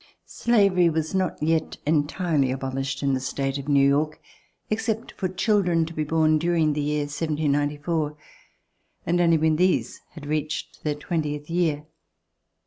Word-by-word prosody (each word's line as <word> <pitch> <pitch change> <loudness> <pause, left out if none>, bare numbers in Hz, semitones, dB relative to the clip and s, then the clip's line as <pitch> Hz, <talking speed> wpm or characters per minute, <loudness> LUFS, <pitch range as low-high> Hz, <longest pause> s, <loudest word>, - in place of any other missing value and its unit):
Slavery 200 -7 +3
was 160 +1 -2
not 190 -2 0
yet 160 0 0
entirely 150 -1 +1
abolished 135 +1 -3
in 140 -1 +2
the 130 - 0
state 135 +1 -2
of 135 - -8
New 140 -1 +4
York, 150 +2 +1 0.5
except 225 +1 -2
for 190 - -3
children 185 -3 +2
to 165 - -8
be 155 - -1
born 155 0 +2
during 165 -2 +2
the 150 - -1
year 150 0 0
of 145 - -6
1794, 150 0 -1 0.9
and 175 +1 +2
only 165 -1 +4
when 155 0 +2
these 185 +2 +1
had 155 -3 -10
reached 155 +1 -3
their 150 -1 0
twentieth 150 -1 -3
year. 160 -4 0
155 Hz, 150 wpm, -24 LUFS, 145-170 Hz, 0.9 s, New